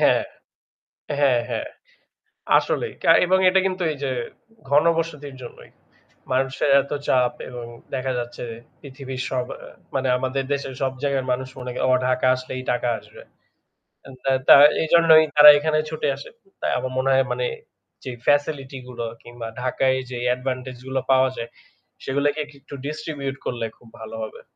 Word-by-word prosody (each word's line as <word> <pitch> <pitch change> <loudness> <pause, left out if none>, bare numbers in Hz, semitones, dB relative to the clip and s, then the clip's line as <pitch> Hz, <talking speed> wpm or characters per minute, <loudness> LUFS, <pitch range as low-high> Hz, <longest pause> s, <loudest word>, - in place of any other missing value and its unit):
হ্যাঁ, - - +4 1.0
হ্যাঁ, 135 -4 +4
হ্যাঁ। 120 - -3 0.9
আসলেই 470 - -2
কা - - +4 0.2
এবং 190 +1 +3
এটা 190 +1 +4
কিন্তু 185 -1 -2
এই - - -7
যে 135 - -1 0.6
ঘনবসতির 150 -1 +1
জন্যই। 120 - -12 0.6
মানুষের 135 +2 0
এত 140 - -10 0.2
চাপ 125 -1 +3 0.2
এবং 125 -1 -7 0.3
দেখা 130 0 -1
যাচ্ছে 120 0 -6 0.4
পৃথিবীর 135 -2 -7
সব 125 -1 -1 0.5
মানে 135 -1 0
আমাদের 130 +1 -2
দেশের 135 -2 -3
সব 130 -1 0
জায়গার 140 -2 0
মানুষ 130 +1 -3
মনে, 125 0 -6 0.2
"ও - - +3 0.2
ঢাকা 130 0 +1
আসলেই 130 0 -6
টাকা 120 0 -1
আসবে।" - - -15 0.9
আ - - -11 0.4
তা - - +11 0.3
এইজন্যই 160 -1 +6
তারা 150 0 +11
এখানে 155 +1 +1
ছুটে 155 -1 -2
আসে। 140 - -10 0.3
তাই - - 0
আমার 130 - -3
মনে 130 +1 +1
হয় 135 0 +3
মানে, - - -1 0.6
জি 130 - -5 0.2
ফ্যাসিলিটি 145 -2 +1
গুলো 120 -2 -5 0.2
কিংবা 120 -1 -8
ঢাকায় 130 +1 +1
যে 125 - -5
অ্যাডভান্টেজ 130 0 -2
গুলো 130 0 -1
পাওয়া 130 0 +4
যায় 115 0 -5 0.5
সেগুলোকে 140 +2 0
একটু 140 -1 -13
ডিস্ট্রিবিউট 150 -2 -4
করলে 120 -2 -2
খুব 120 - -20
ভালো 110 0 -8
হবে। 110 - -8
135 Hz, 150 wpm, -23 LUFS, 130-145 Hz, 1.0 s, তা